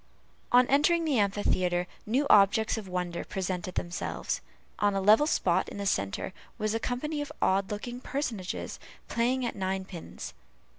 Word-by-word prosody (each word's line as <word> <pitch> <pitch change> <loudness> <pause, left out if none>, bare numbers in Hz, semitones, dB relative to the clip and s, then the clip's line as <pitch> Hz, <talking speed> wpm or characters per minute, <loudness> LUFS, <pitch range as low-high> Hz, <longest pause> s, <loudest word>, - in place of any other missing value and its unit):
On 250 +1 +7
entering 315 +6 +3
the 285 -7 +2
amphitheatre, 185 -3 +1 0.2
new 260 +7 +2
objects 210 0 +5
of 215 -3 -6
wonder 180 -1 -3
presented 185 -1 -3
themselves. 175 0 -3 0.4
On 205 -1 +2
a - - +2
level 215 +9 +6
spot - - +2
in - - -8
the 200 - -3
centre 100 - -1 0.2
was 215 -1 0
a 225 - 0
company 290 +6 -2
of 290 - -5
odd 190 0 +2
looking 240 +4 -5
personages 245 -9 -3 0.3
playing 250 +2 +1
at 235 - -3
ninepins. 190 -3 -4
205 Hz, 150 wpm, -29 LUFS, 185-250 Hz, 0.4 s, On